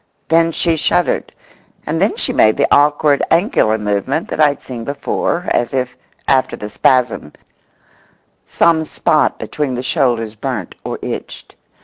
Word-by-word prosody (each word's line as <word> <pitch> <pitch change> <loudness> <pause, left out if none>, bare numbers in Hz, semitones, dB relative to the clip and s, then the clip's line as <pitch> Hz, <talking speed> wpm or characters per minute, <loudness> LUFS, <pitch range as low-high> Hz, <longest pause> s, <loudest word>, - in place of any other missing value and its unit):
Then 165 0 +3
she 165 0 0
shuddered, 175 +3 0 0.5
and - - -2
then - - +2
she - - -2
made 110 0 +4
the - - +3
awkward 145 0 +3
angular 165 - +2
movement 105 +8 -2
that - - -4
I 150 - +7
had 145 -1 -3
seen 120 -3 -7
before, 145 +6 -2
as 120 +2 0
if, 125 -1 -2 0.3
after 130 -1 +2
the 105 0 -8
spasm, 125 - +1 1.1
some 165 -1 +2
spot 155 0 +1
between 145 -4 -3
the 125 - -4
shoulders 115 -5 0
burnt 110 - -5
or - - -4
itched. - - -7
135 Hz, 145 wpm, -17 LUFS, 120-160 Hz, 1.1 s, I